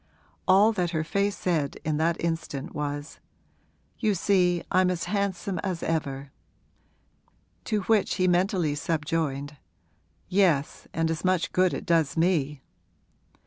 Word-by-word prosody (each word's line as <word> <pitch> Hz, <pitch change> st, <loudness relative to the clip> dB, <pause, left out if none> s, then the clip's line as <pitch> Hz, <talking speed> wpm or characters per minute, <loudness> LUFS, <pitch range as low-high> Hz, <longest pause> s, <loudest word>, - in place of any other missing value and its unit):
All 195 Hz, +4 st, +6 dB
that 180 Hz, -5 st, -1 dB
her 155 Hz, -, 0 dB
face 200 Hz, +5 st, 0 dB
said 155 Hz, -6 st, -1 dB
in 155 Hz, -1 st, 0 dB
that 165 Hz, +2 st, +1 dB
instant 165 Hz, -5 st, -3 dB
was, 145 Hz, +1 st, -4 dB, 0.8 s
'You 215 Hz, -4 st, +1 dB
see 180 Hz, -2 st, +2 dB
I'm 185 Hz, 0 st, +4 dB
as 180 Hz, -2 st, -2 dB
handsome 195 Hz, -1 st, -2 dB
as 180 Hz, -2 st, -3 dB
ever.' 140 Hz, -4 st, -2 dB, 1.3 s
To 215 Hz, -2 st, 0 dB
which 215 Hz, +1 st, +2 dB
he 185 Hz, -, +2 dB
mentally 180 Hz, -3 st, +2 dB
subjoined, 150 Hz, -2 st, -2 dB, 0.7 s
'Yes, 180 Hz, -7 st, +1 dB
and 165 Hz, 0 st, 0 dB
as 165 Hz, -, -4 dB
much 185 Hz, -2 st, +1 dB
good 185 Hz, -1 st, +3 dB
it -, -, -5 dB
does 165 Hz, -4 st, +2 dB
me!' 150 Hz, -5 st, +1 dB
170 Hz, 130 wpm, -26 LUFS, 150-185 Hz, 1.3 s, All